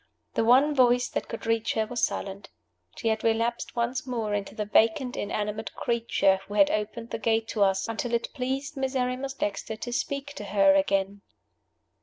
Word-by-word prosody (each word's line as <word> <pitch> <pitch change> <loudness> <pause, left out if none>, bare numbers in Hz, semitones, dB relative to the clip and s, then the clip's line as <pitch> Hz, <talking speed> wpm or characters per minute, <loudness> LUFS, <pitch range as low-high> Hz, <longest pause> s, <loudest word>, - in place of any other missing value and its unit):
The - - +1
one 260 +6 +5
voice 250 -2 +4
that - - -3
could 230 - -7
reach 225 -1 +1
her 220 - +1
was 240 +2 -4
silent. 195 0 -2 0.5
She 225 - -1
had 220 0 -1
relapsed 230 +1 0
once 245 +2 -1
more 225 -4 -2
into 205 0 -3
the 210 -2 -2
vacant 225 +5 +2
inanimate 210 0 -3
creature 225 -5 +1
who 205 - -6
had 200 -2 +5
opened 220 +2 -3
the 225 - -3
gate 225 +1 +1
to 215 - -2
us, 195 0 +3
until 230 +1 -2
it 235 - -3
pleased 270 +3 -3
Miserrimus 265 0 -2
Dexter 205 -1 -3
to 240 +2 -6
speak 280 +3 -3
to 210 - -6
her 195 -1 +4
again. 195 +1 +1
225 Hz, 180 wpm, -27 LUFS, 205-250 Hz, 0.5 s, one